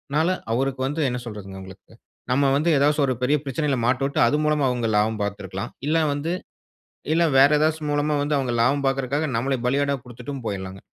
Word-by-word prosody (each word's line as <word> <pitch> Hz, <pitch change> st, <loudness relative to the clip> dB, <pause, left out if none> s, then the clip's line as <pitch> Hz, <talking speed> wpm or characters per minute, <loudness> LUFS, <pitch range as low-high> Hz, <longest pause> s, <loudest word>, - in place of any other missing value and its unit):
னால 160 Hz, +3 st, +3 dB, 0.2 s
அவருக்கு 130 Hz, +1 st, -1 dB
வந்து, 150 Hz, +3 st, -2 dB
என்ன 125 Hz, -, -3 dB
சொல்றதுங்க 100 Hz, -4 st, -8 dB
உங்களுக்கு? 95 Hz, +3 st, -13 dB, 0.4 s
நம்ம 140 Hz, +2 st, +3 dB
வந்து, 155 Hz, +4 st, +1 dB
எதாச்சும் 145 Hz, +1 st, +3 dB
ஒரு 130 Hz, -, +1 dB
பெரிய 145 Hz, +4 st, +3 dB
பிரச்சனையில 140 Hz, 0 st, -1 dB
மாட்டவுட்டு, 135 Hz, +3 st, 0 dB
அது 145 Hz, -, +2 dB
மூலமா 150 Hz, -2 st, +2 dB
அவுங்க 120 Hz, -2 st, -1 dB
லாபம் 110 Hz, 0 st, +1 dB
பாத்துருக்கலாம். 100 Hz, +1 st, -5 dB
இல்ல 160 Hz, 0 st, +2 dB
வந்து 150 Hz, +4 st, -2 dB, 0.8 s
இல்ல 170 Hz, +1 st, +3 dB
வேற 140 Hz, +2 st, +7 dB
ஏதாச்சு 155 Hz, +1 st, +1 dB
மூலமா 145 Hz, +1 st, +1 dB
வந்து 145 Hz, +1 st, -1 dB
அவுங்க 130 Hz, -3 st, -1 dB
லாபம் 140 Hz, +4 st, +2 dB
பாக்குறக்காக, 135 Hz, +3 st, 0 dB
நம்மள 135 Hz, +4 st, 0 dB
பலியாடா 140 Hz, +2 st, +1 dB
குடுத்துட்டும் 125 Hz, +2 st, -8 dB
போயிர்லாங்க. 95 Hz, -2 st, -5 dB
135 Hz, 175 wpm, -23 LUFS, 120-145 Hz, 0.8 s, வேற